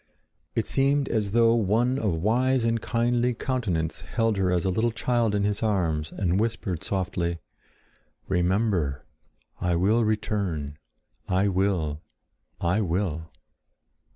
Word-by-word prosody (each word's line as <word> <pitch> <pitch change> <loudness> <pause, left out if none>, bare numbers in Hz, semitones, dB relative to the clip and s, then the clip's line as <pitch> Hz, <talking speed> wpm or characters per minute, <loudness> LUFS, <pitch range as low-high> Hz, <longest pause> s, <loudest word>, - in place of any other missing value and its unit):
It 115 - +1
seemed 140 +1 +2
as 105 -3 0
though 115 +1 +4
one 120 +4 +2
of 105 -7 0
wise 125 +3 +2
and 115 -1 +1
kindly 120 +1 +1
countenance 95 -12 -2
held 115 -2 0
her 95 -2 +1
as 90 0 +1
a 95 - +2
little 110 +6 +1
child 115 -1 0
in 100 - +1
his 105 0 -1
arms 85 -8 0
and 95 -1 0
whispered 105 -6 -2
softly, 90 -3 -2 0.9
"Remember! 90 - 0 0.5
I 90 -1 +1
will 105 +7 +3
return! 100 -9 -2 0.5
I 95 +2 +2
will! 90 -6 0 0.6
I 90 +5 +1
will!" 85 -4 -2
100 Hz, 125 wpm, -26 LUFS, 90-115 Hz, 0.9 s, though